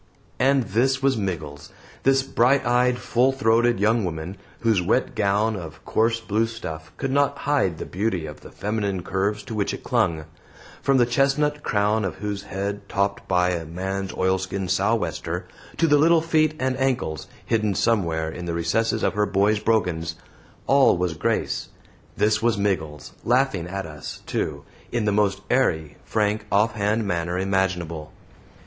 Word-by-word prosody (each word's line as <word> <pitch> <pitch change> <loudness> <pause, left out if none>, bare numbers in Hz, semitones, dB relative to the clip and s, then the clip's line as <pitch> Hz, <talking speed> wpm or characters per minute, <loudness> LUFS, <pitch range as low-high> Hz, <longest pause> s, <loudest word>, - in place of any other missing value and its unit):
And 135 0 +4
this 130 +6 +1
was 135 -1 +3
Miggles! 80 -9 -4 0.3
this 135 0 +3
bright 135 +1 +2
eyed, 125 +1 +3
full 125 +1 +2
throated 120 -3 +2
young 110 +2 +3
woman, 85 +1 -4 0.3
whose 110 -5 +3
wet 90 - +1
gown 105 +2 +1
of 85 -5 -9
coarse 115 +1 +1
blue 115 0 0
stuff 80 -8 -7
could 135 -1 -2
not 140 +1 +2
hide 135 - +1
the - - -5
beauty 95 -3 -2
of 75 -1 -9
the - - -11
feminine 100 -3 -2
curves 100 +3 -1
to 115 - -7
which 105 -2 -1
it - - -12
clung; 80 -2 0 0.6
from 135 -1 +3
the 120 - +5
chestnut 145 +4 +1
crown 105 -1 +1
of 95 - -2
whose 105 -1 -4
head, 100 +1 -4
topped 100 0 -1
by 90 0 +2
a 85 -2 -2
man's 95 +4 -4
oilskin 95 +1 -1
sou'wester, 100 +5 -1 0.3
to 165 - +3
the 145 -2 +4
little 165 +2 +5
feet 155 -2 +2
and 130 0 0
ankles, 125 - -1 0.2
hidden 110 -4 +1
somewhere 85 -9 +1
in 85 +2 -6
the 85 -1 -2
recesses 110 +7 0
of - - +2
her 105 0 +1
boy's 100 +2 +2
brogans, 90 -7 0 0.5
all 135 -8 +5
was 90 -1 0
grace 80 - -1 0.5
this 110 +1 +2
was 115 -2 +2
Miggles, 80 -8 -2
laughing 120 -8 +1
at 95 +1 -4
us, 75 -2 -8
too, - - -3 0.3
in 120 -3 0
the 105 - +2
most 100 -2 +1
airy, 80 - +1
frank, 105 0 -1
offhand 105 +1 +1
manner 85 -1 -1
imaginable. 90 -5 -1
105 Hz, 160 wpm, -24 LUFS, 90-120 Hz, 0.6 s, the